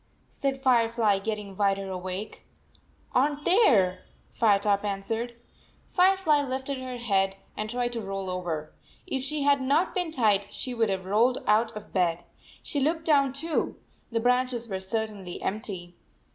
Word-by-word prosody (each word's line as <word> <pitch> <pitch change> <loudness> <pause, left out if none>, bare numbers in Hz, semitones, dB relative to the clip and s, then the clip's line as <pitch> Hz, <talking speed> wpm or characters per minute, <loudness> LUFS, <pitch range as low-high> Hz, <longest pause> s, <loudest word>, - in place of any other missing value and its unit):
" - - -38
said 270 -1 -2
Firefly, 230 -5 +3
getting 210 -1 -4
wider 195 -1 +1
awake. 185 +3 -5 0.7
"Are 260 +3 +4
n 290 - -5
t 295 - -15
there," 220 - +4 0.3
Firetop 205 -2 +2
answered. 220 +4 -2 0.5
Firefly 365 -5 +4
lifted 265 0 -3
her 255 -1 -5
head 195 -5 +1 0.2
and 215 0 -4
tried 240 +1 -1
to 230 - -3
roll 195 -1 -4
over. 175 -4 -4 0.3
If 265 - -2
she 290 +2 -1
had 280 -1 +4
not 285 +7 +2
been 360 -3 -1
tied 215 -9 +2
she 255 - -2
would 230 -2 +1
have 190 -1 -2
rolled 230 +6 +2
out 220 +2 +3
of 210 - -11
bed. 175 -2 +1 0.4
She 290 - -1
looked 320 +4 0
down, 280 -4 +4
too. 310 +4 -2 0.3
The 230 - +1
branches 250 0 +1
were 190 -3 -3
certainly 200 -2 -3
empty. 190 -4 -5
225 Hz, 160 wpm, -27 LUFS, 195-265 Hz, 0.7 s, Are